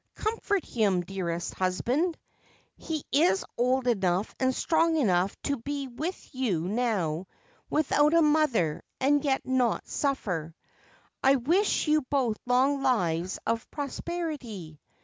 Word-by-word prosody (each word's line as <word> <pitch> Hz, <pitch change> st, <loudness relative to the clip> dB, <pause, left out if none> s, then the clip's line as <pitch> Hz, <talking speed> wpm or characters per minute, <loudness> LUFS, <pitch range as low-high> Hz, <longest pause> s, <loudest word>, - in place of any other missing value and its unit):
Comfort 425 Hz, -4 st, -1 dB
him, 200 Hz, -6 st, +1 dB
dearest 175 Hz, -2 st, -4 dB
husband! 250 Hz, -, 0 dB, 0.6 s
He 315 Hz, -3 st, -4 dB
is 335 Hz, +7 st, +3 dB
old 255 Hz, +1 st, +1 dB
enough 195 Hz, -5 st, +1 dB
and 260 Hz, 0 st, +2 dB
strong 325 Hz, +4 st, +2 dB
enough 190 Hz, -, +1 dB
to 285 Hz, -1 st, 0 dB
be 280 Hz, +3 st, -4 dB
with 315 Hz, +10 st, -6 dB
you 235 Hz, -11 st, 0 dB
now 190 Hz, -7 st, -1 dB, 0.4 s
without 300 Hz, +1 st, +3 dB
a 335 Hz, -, +6 dB
mother 295 Hz, -, +2 dB, 0.2 s
and 285 Hz, +2 st, +3 dB
yet 270 Hz, -2 st, 0 dB
not 255 Hz, -3 st, +1 dB
suffer. 180 Hz, -, -2 dB, 0.7 s
I 270 Hz, +1 st, +6 dB
wish 335 Hz, -, +1 dB
you 305 Hz, 0 st, +4 dB
both 255 Hz, -5 st, 0 dB
long 265 Hz, +3 st, +3 dB
lives 180 Hz, -9 st, +1 dB
of 230 Hz, 0 st, -1 dB
prosperity. 280 Hz, -, -5 dB
255 Hz, 125 wpm, -28 LUFS, 195-295 Hz, 0.7 s, a